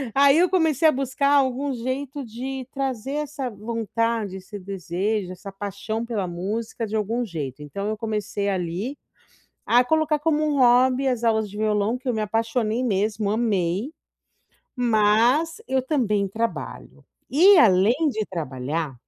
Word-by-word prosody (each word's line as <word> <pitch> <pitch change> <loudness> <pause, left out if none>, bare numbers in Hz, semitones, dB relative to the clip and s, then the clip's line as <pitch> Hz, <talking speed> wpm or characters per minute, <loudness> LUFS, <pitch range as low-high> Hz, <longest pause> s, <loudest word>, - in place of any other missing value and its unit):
Aí, 280 +1 +6
eu 360 - +4
comecei 320 -4 +3
a - - +6
buscar 275 +1 0
algum 275 0 +2
jeito 260 +4 -4
de 255 +3 -6
trazer 270 -2 -3
essa 295 -2 -3
vontade, 225 -2 -2
esse 190 +2 -9
desejo, 190 +1 -3
essa 195 +2 -9
paixão 205 +3 -4
pela 220 -5 -2
música 215 +6 -4
de 215 - -4
algum 220 +3 -1
jeito, 150 - -6
então 195 +8 -5
eu 215 0 -2
comecei, 210 -2 -3
ali, 190 +8 -3 0.7
a 245 +1 +5
colocar 310 +2 +1
como 305 0 +1
um 295 -2 0
hobby, 255 +2 +4
as 245 -3 -1
aulas 220 -2 +1
de 205 - -10
violão, 215 +2 +1
que 255 - -11
eu 250 - +1
me 220 - -1
apaixonei 225 +2 -1
mesmo, 210 -1 0
amei, 210 - 0 0.9
mas 240 - +2
eu 265 0 +2
também 235 -8 0
trabalho 225 +4 -5 0.3
e 370 +8 +7
além 200 -2 +5 0.2
de 215 -4 -3
trabalhar, 150 -2 -4
225 Hz, 150 wpm, -24 LUFS, 200-265 Hz, 0.9 s, e